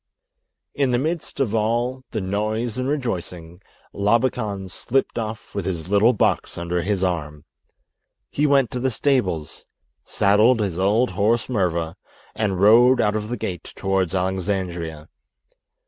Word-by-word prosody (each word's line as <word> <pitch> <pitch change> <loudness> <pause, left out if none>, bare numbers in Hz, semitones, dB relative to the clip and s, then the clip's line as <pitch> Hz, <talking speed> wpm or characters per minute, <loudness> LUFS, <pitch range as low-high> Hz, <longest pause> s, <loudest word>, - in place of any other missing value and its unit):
In 140 -2 +1
the 120 - +2
midst 155 +3 -3
of 125 -6 0
all 120 +4 0
the 110 - -3
noise 110 +5 -2
and 130 +1 -1
rejoicing 90 - -4 0.3
Labakan 105 -2 0
slipped 130 +7 -1
off 110 -1 -6
with 100 -3 -3
his 85 -2 -4
little 105 +4 +5
box 110 - 0
under 85 +1 -2
his 95 +1 -1
arm. 75 -5 -3 0.9
He 150 +1 +1
went 140 -3 +3
to 125 - -3
the 130 +2 +1
stables, 105 - -1 0.4
saddled 105 +5 +3
his 95 -5 -2
old 105 +5 +2
horse, 110 +5 +1
Murva, 85 -8 -1 0.4
and 100 -4 -1
rode 120 +5 +6
out 105 -2 +2
of 105 0 -3
the 120 - -3
gate 90 -3 -6
towards 95 -2 0
Alexandria. 90 -4 -2
105 Hz, 140 wpm, -22 LUFS, 90-120 Hz, 0.9 s, rode